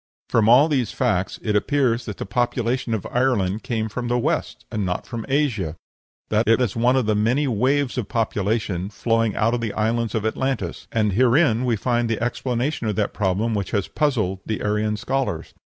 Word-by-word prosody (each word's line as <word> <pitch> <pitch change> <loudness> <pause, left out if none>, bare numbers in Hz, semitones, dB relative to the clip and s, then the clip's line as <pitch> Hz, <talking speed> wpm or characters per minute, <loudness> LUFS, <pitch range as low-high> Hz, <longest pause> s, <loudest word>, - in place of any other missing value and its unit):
From 110 -1 +3
all 130 +6 +7
these 130 -8 0
facts 100 -7 0
it 105 -2 0
appears 125 +1 +1
that 105 - -6
the - - -4
population 120 +2 0
of 105 - -5
Ireland 110 -6 +1
came 110 -4 -2
from 120 +3 -4
the 120 +1 +1
West, 120 - -2
and 110 -3 -1
not 90 -1 -2
from 115 -3 -6
Asia 120 - 0 0.5
that 110 +2 +1
it 115 0 +5
was 120 -6 0
one 120 +3 +3
of 130 -3 +2
the 110 - +2
many 120 +8 +1
waves 130 +3 +1
of 115 - -5
population 105 -4 -1
flowing 115 +1 0
out 115 +2 +2
from 120 - -1
the 115 -3 -2
Island 115 +1 0
of 110 -1 -1
Atlantis 130 +3 -2
and 105 -3 +1
herein 125 - +3
we 120 -2 +2
find 120 +1 0
the 115 - -1
explanation 120 +2 -1
of 105 - -1
that 105 -2 -1
problem 105 +3 0
which 100 -3 -2
has 100 - -2
puzzled 110 - 0
the 110 - -3
Aryan 105 +1 0
scholars. 120 -8 -2
115 Hz, 195 wpm, -22 LUFS, 105-125 Hz, 0.5 s, all